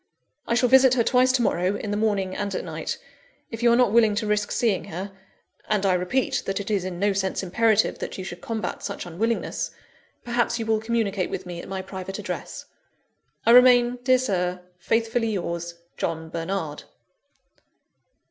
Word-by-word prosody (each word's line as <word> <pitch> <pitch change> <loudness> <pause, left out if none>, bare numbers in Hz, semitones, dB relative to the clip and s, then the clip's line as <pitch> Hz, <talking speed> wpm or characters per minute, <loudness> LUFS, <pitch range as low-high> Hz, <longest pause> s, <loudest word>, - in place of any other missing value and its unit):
"I 235 - +1
shall 250 +1 +3
visit 260 0 +6
her 235 - +3
twice 255 +2 +4
to 250 -2 +2
morrow, 180 -1 +1
in 205 0 -4
the - - 0
morning 205 -3 0
and 200 -2 -3
at - - -2
night. - - -4 0.5
If 225 0 -6
you 240 0 +5
are - - +5
not 245 -4 +4
willing 220 -2 +4
to 215 +1 -1
risk 210 -1 0
seeing 215 -6 +1
her 190 +4 -6 0.6
(and 210 -2 +1
I 190 - +4
repeat 180 +9 0
that 195 0 -1
it 200 +1 -4
is 195 -3 0
in 185 -2 -4
no 200 +2 +1
sense 190 0 -1
imperative 220 +3 +2
that - - -5
you 190 - -5
should 175 -1 -8
combat 225 -2 -4
such - - -5
unwillingness), 220 +7 -2 0.6
perhaps 240 -1 0
you 225 - -3
will 220 -1 +1
communicate 220 -5 -1
with 185 - -5
me 175 -1 -6
at - - -11
my 190 -1 -4
private 190 0 -6
address. - - -6 0.8
"I 230 - +5
remain, 245 0 +6
dear 255 0 +4
Sir, 180 -7 -1 0.2
"Faithfully 225 +3 0
yours, 170 -2 -4 0.2
"JOHN 160 -1 -3
BERNARD. 165 -2 -4
205 Hz, 185 wpm, -24 LUFS, 185-235 Hz, 0.8 s, visit